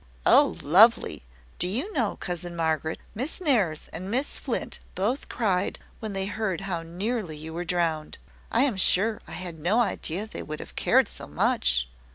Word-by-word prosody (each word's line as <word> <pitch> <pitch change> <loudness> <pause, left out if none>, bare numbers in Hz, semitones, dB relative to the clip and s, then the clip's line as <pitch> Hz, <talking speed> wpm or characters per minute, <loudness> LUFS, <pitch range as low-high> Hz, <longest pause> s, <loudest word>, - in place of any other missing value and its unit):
"Oh, - - +5
lovely! 175 - +5 0.3
Do 180 - +3
you 260 - -2
know, 235 - 0
cousin 175 -1 -4
Margaret, 160 -1 -1 0.2
Miss 260 +9 -1
Nares 215 - +1
and 185 +4 -5
Miss 260 +6 0
Flint - - -3 0.2
both 220 +9 -1
cried 195 -6 0 0.2
when 215 -2 -5
they 195 0 -1
heard 200 -3 -2
how 185 -4 -3
nearly 180 +1 -3
you 160 +1 -8
were 175 +2 -3
drowned! 165 -3 -1 0.3
I 235 - +4
am 255 -8 +1
sure, 205 +3 +4
I - - -9
had 175 -3 -6
no 185 +9 +2
idea 200 -4 -1
they 220 - -7
would 155 0 -6
have - - -10
cared - - +4
so - - -7
much." 60 0 +2
185 Hz, 175 wpm, -26 LUFS, 165-220 Hz, 0.3 s, Oh